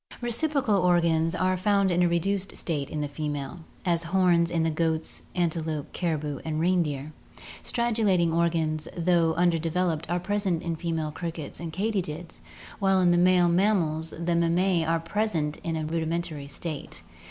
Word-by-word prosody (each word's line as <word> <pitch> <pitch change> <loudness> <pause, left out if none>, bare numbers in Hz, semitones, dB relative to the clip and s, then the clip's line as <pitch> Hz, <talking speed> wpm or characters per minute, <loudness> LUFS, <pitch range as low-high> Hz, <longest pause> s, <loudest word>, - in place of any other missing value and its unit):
Reciprocal 240 -2 +1
organs 170 -2 +2
are 185 0 +1
found 195 0 +2
in 175 +1 +2
a 175 - +4
reduced 195 +3 -1
state 145 -5 -2
in 150 - -3
the 145 - -1
female, 145 +2 -4 0.3
as 170 -2 +2
horns 175 -1 +3
in 170 -1 0
the 160 - +1
goats, 160 0 -1
antelope, 160 -4 -1
caribou, 150 -5 -2
and 155 -1 -2
reindeer. 155 -4 0 0.5
Stridulating 215 -8 +1
organs, 165 -2 0
though 170 -2 +2
undeveloped, 170 -1 +1
are 175 +1 +1
present 190 -2 -1
in 170 -1 -2
female 160 -2 -2
crickets 165 -2 -6
and 165 -1 -5
katydids, 175 -4 -3 0.4
while 195 -1 +3
in 175 -1 +4
male 180 -1 +5
mammals 170 -4 +1
the 170 +2 -2
mammae 170 +1 +2
are 165 +1 +1
present 165 -5 -1
in 165 -1 -2
a 155 - -2
rudimentary 160 -2 -2
state. 145 - -6
170 Hz, 150 wpm, -27 LUFS, 160-180 Hz, 0.5 s, male